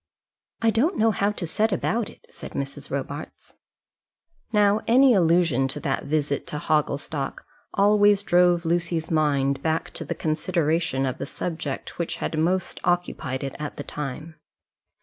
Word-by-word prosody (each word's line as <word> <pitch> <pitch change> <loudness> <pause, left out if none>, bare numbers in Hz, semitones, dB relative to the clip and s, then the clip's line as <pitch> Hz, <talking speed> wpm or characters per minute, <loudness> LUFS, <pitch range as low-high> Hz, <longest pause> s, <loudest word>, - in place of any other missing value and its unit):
"I 225 - +5
don't 295 - +1
know 225 +1 +4
how 200 0 +1
to 190 - -4
set 215 +7 0
about 220 +3 0
it," - - -17
said - - -10
Mrs. 140 +1 -5
Robarts. 140 +2 -6 0.9
Now 210 -1 +3
any 255 +2 +6
allusion 165 - +3
to 135 - -4
that 135 - -1
visit 145 -1 -1
to 150 - -4
Hogglestock 145 -2 -1 0.3
always 205 0 +4
drove 175 -2 +3
Lucy's 170 -1 0
mind 140 -3 +1
back 160 +1 -1
to - - -5
the - - -4
consideration 155 -3 0
of 130 - -3
the - - -4
subject 160 -5 -5
which 170 - -2
had - - -3
most 180 +3 0
occupied 175 -7 -1
it 135 - -4
at 150 -1 -5
the 145 - -4
time. 150 +3 -6
165 Hz, 150 wpm, -25 LUFS, 145-195 Hz, 0.9 s, any